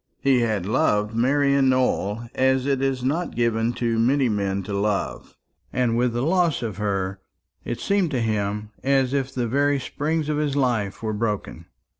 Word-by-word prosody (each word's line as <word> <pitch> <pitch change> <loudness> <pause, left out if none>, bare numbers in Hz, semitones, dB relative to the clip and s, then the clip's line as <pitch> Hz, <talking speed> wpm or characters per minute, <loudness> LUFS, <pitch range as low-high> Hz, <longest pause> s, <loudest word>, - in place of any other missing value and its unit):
He 135 -2 +3
had 110 -6 0
loved 105 +1 +1
Marian 140 +2 +3
Nowell 120 -3 0
as 130 0 +2
it 135 -2 0
is 135 -2 -1
not 160 +7 -1
given 115 -1 +1
to 115 -2 -1
many 130 +2 +3
men 100 -2 -1
to 100 - -6
love; 100 0 -2 0.3
and 120 -2 +1
with 120 0 +1
the 120 +1 -1
loss 170 -3 +1
of 110 -4 -4
her, 100 -2 -2 0.4
it - - -4
seemed 200 -4 +1
to 135 -5 -1
him 105 -1 -2
as 135 -1 +2
if 135 -1 -1
the 125 -2 -2
very 140 +3 +2
springs 150 +4 -2
of 150 -1 0
his 150 -2 0
life 115 -7 0
were 110 -1 -1
broken. 105 -6 -3
120 Hz, 175 wpm, -23 LUFS, 105-140 Hz, 0.4 s, He